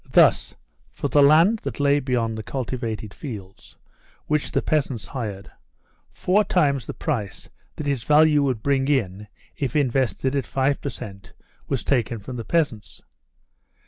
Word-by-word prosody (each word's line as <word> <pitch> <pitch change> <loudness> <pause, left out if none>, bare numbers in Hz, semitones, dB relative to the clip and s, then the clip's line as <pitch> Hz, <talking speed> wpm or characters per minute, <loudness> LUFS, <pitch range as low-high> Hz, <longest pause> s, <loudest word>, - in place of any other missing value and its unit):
Thus, - - +4 0.3
for 145 - -4
the 145 +3 +4
land 165 +10 +6
that - - -6
lay 145 0 +3
beyond 120 -5 -1
the 110 - -4
cultivated 115 -4 -4
fields, 100 -10 -9 0.5
which 150 -1 -1
the - - 0
peasants 135 -9 0
hired, 105 -6 -6 0.6
four 200 +4 +2
times 140 - +1
the - - -4
price 115 - -4 0.2
that 150 - -5
its 140 -4 0
value 150 +2 +5
would 130 -6 -1
bring 135 -1 +1
in 105 -8 0 0.3
if 135 -3 -2
invested 130 -2 +1
at 135 -5 -1
five 135 +1 0
per 140 - -3
cent 100 -6 -10 0.3
was - - -2
taken 120 -4 0
from 115 +5 -8
the 115 - -4
peasants. 135 - -2
135 Hz, 150 wpm, -23 LUFS, 115-145 Hz, 0.6 s, land